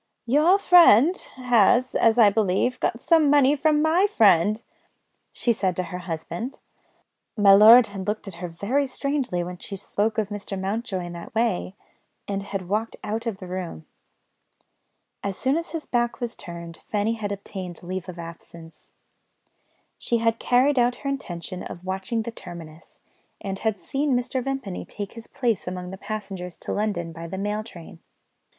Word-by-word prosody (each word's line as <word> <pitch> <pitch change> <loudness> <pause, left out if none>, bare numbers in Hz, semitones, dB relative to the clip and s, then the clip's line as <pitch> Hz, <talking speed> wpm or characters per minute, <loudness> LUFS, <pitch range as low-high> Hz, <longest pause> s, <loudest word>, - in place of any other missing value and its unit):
"Your 305 +10 +4
friend 350 - +6 0.2
has, 245 -1 +3
as 225 0 +3
I 215 -4 +7
believe, 215 +4 +1
got 230 - -1
some 320 0 +4
money 285 0 +5
from 300 +1 +2
my 340 +5 +4
friend," 210 - +4 0.7
she 235 - +1
said 190 -4 -1
to 185 - -1
her 180 - -3
husband. 175 - -5 0.8
My 200 -2 +7
lord 225 +4 +9
had 195 -2 -7
looked 210 0 -2
at 195 - -6
her 180 - -3
very 225 +12 -1
strangely 265 -9 -2
when 180 0 -7
she 200 - -7
spoke 205 +3 -2
of 215 -2 0
Mr. 205 -2 -5
Mountjoy 195 0 -3
in 175 - -7
that 170 +4 -10
way, 220 -4 0 0.5
and 200 -1 -2
had 195 -2 -5
walked 215 +4 -1
out 225 +3 -3
of 220 -4 -2
the 190 - -9
room. 180 - -6 1.4
As 200 -2 -3
soon 265 +2 +1
as 335 +2 -3
his 325 -3 -5
back 240 -1 -1
was 240 -1 -3
turned, 170 -2 -9
Fanny 210 +2 0
had 215 -3 -4
obtained 190 -3 -7
leave 185 +1 -5
of 175 - -8
absence. 165 -1 -12 1.1
She 235 - 0
had 230 0 +1
carried 255 +2 +3
out 245 0 +3
her - - +1
intention 180 -9 -5
of 175 - -8
watching 190 +5 -2
the 235 - -5
terminus, 170 -6 -12 0.4
and 195 -1 -5
had 220 -3 -1
seen 275 +2 0
Mr. 250 +1 -2
Vimpany 270 -8 -4
take 205 -1 -7
his 230 -1 -10
place 230 -9 -1
among 180 0 -5
the - - -6
passengers 195 -4 -6
to - - -5
London 200 -6 -2
by 165 +1 -8
the 190 +3 -6
mail 210 +2 -2
train. 175 -4 -12
210 Hz, 170 wpm, -24 LUFS, 185-245 Hz, 1.4 s, lord